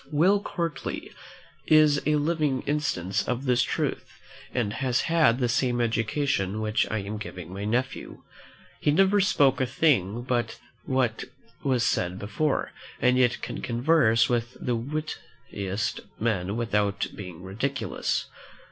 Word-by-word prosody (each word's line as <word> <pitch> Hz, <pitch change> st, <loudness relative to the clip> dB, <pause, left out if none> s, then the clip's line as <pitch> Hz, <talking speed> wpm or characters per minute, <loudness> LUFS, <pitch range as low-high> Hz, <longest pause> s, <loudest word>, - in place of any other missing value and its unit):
Will 180 Hz, +7 st, +4 dB
Courtly 170 Hz, -6 st, -4 dB, 0.6 s
is 155 Hz, -2 st, +5 dB
a 150 Hz, -, +3 dB
living 150 Hz, -3 st, 0 dB
instance 105 Hz, -, -1 dB
of 125 Hz, +2 st, -2 dB
this 125 Hz, -1 st, +3 dB
truth, -, -, -2 dB, 0.3 s
and 110 Hz, -5 st, -1 dB
has 130 Hz, -2 st, 0 dB
had 160 Hz, -8 st, +3 dB
the 125 Hz, -2 st, +1 dB
same 125 Hz, -1 st, +1 dB
education 110 Hz, -2 st, 0 dB
which 110 Hz, +2 st, 0 dB
I 110 Hz, -, -1 dB
am 105 Hz, +2 st, -5 dB
giving 90 Hz, -3 st, -8 dB
my 100 Hz, +2 st, -4 dB
nephew. 125 Hz, +4 st, -2 dB, 0.6 s
He -, -, +1 dB
never 195 Hz, +6 st, +4 dB
spoke 145 Hz, -9 st, +3 dB
a 130 Hz, -, +1 dB
thing 120 Hz, -, +1 dB
but 120 Hz, -1 st, -1 dB, 0.3 s
what 130 Hz, -4 st, 0 dB, 0.4 s
was 130 Hz, -4 st, +1 dB
said 90 Hz, -6 st, 0 dB
before, 110 Hz, +9 st, -1 dB, 0.3 s
and 125 Hz, 0 st, +3 dB
yet 125 Hz, -1 st, +2 dB
can -, -, -5 dB
converse 120 Hz, -2 st, +3 dB
with 120 Hz, 0 st, -1 dB
the 125 Hz, -, -1 dB
wittiest 115 Hz, -7 st, -4 dB, 0.2 s
men 105 Hz, -2 st, -1 dB
without 105 Hz, -3 st, 0 dB
being 90 Hz, -4 st, -8 dB
ridiculous. 115 Hz, +6 st, -2 dB
125 Hz, 135 wpm, -26 LUFS, 105-145 Hz, 0.6 s, is